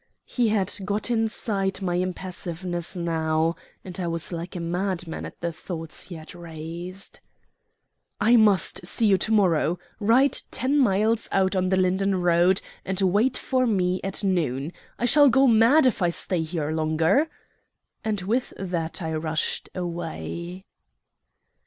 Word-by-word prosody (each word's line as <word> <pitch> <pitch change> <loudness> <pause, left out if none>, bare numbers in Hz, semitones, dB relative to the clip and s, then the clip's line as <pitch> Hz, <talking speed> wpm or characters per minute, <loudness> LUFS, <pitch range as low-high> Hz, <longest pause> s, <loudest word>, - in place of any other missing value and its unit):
He 240 -3 0
had 205 -3 +1
got 205 +4 -2
inside 215 -4 -1
my 185 -3 -2
impassiveness 180 -1 -3
now, 165 -1 0 0.3
and 185 0 -6
I 175 - -2
was 165 +1 -2
like 170 +2 -6
a - - -3
madman 175 0 -3
at - - -14
the 170 -1 -1
thoughts 165 -1 -6
he 180 - -8
had 155 0 -10
raised. 170 +2 -8 1.0
"I 225 +4 +5
must 210 -5 +3
see 210 +5 +1
you 195 -3 +4
to 220 - -1
morrow. 180 -5 +3 0.2
Ride 235 +6 +3
ten 270 +4 +1
miles 220 -1 +2
out 190 0 +2
on 185 0 +1
the 190 - +2
Linden 190 +1 +1
road, 175 +1 +3 0.2
and 190 0 -2
wait 205 +7 +2
for 255 -1 0
me 185 -4 +1
at 195 +2 -1
noon. 160 -5 0 0.2
I 240 - -1
shall 290 +3 +6
go 270 +3 +4
mad 235 +5 +5
if 250 -5 +2
I 175 - +3
stay 170 0 -1
here 155 -2 -3
longer." 160 - +2 0.7
And 215 -3 -1
with 230 +7 -1
that 170 -3 -3
I 160 0 -2
rushed 155 0 -2
away. 175 +1 -5
185 Hz, 150 wpm, -25 LUFS, 170-210 Hz, 1.0 s, shall